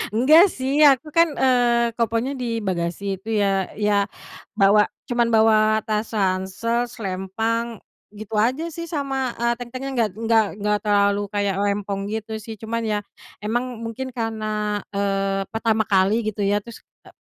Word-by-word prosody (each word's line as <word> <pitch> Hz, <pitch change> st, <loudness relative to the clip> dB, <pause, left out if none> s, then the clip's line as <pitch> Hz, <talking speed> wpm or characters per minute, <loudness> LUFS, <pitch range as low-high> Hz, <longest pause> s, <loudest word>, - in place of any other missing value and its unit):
Enggak 310 Hz, -, +6 dB
sih 275 Hz, 0 st, -1 dB
aku 295 Hz, +1 st, +5 dB
kan, 335 Hz, 0 st, +5 dB
eee, 240 Hz, -2 st, +3 dB
kopernya 230 Hz, +3 st, -1 dB
di 240 Hz, -4 st, -3 dB
bagasi 190 Hz, 0 st, -3 dB
itu 220 Hz, 0 st, -2 dB
ya, 195 Hz, -2 st, +1 dB
ya 205 Hz, -1 st, +1 dB, 0.5 s
bawa 205 Hz, +1 st, +5 dB, 0.2 s
cuman 240 Hz, -1 st, +1 dB
bawa 220 Hz, -1 st, +5 dB, 0.3 s
tas 215 Hz, 0 st, -1 dB
ransel, 195 Hz, +5 st, 0 dB
selempang, 225 Hz, +3 st, -3 dB, 0.4 s
gitu 215 Hz, +1 st, -9 dB
aja 260 Hz, +8 st, 0 dB
sih 335 Hz, 0 st, -6 dB
sama, 270 Hz, -4 st, -2 dB
eee, 235 Hz, 0 st, +1 dB
tentengan 255 Hz, +3 st, -6 dB
enggak 230 Hz, -4 st, +1 dB
enggak 225 Hz, -1 st, +3 dB
enggak 210 Hz, 0 st, +1 dB
terlalu 200 Hz, -1 st, +2 dB
kayak 200 Hz, -1 st, 0 dB
rempong 200 Hz, -1 st, -1 dB
gitu 220 Hz, 0 st, -4 dB
sih 220 Hz, 0 st, -8 dB
cuman 230 Hz, +2 st, -3 dB
ya 215 Hz, -2 st, -1 dB, 0.5 s
emang 240 Hz, +3 st, -2 dB
mungkin 245 Hz, +3 st, -5 dB
karena, 215 Hz, -3 st, -2 dB
eee, 195 Hz, -1 st, -1 dB
pertama 225 Hz, -1 st, +1 dB
kali 200 Hz, +2 st, +2 dB
gitu 215 Hz, -1 st, -3 dB
ya 200 Hz, +1 st, +2 dB
terus, 230 Hz, +3 st, -9 dB, 0.2 s
e -, -, -14 dB
220 Hz, 150 wpm, -22 LUFS, 205-240 Hz, 0.5 s, Enggak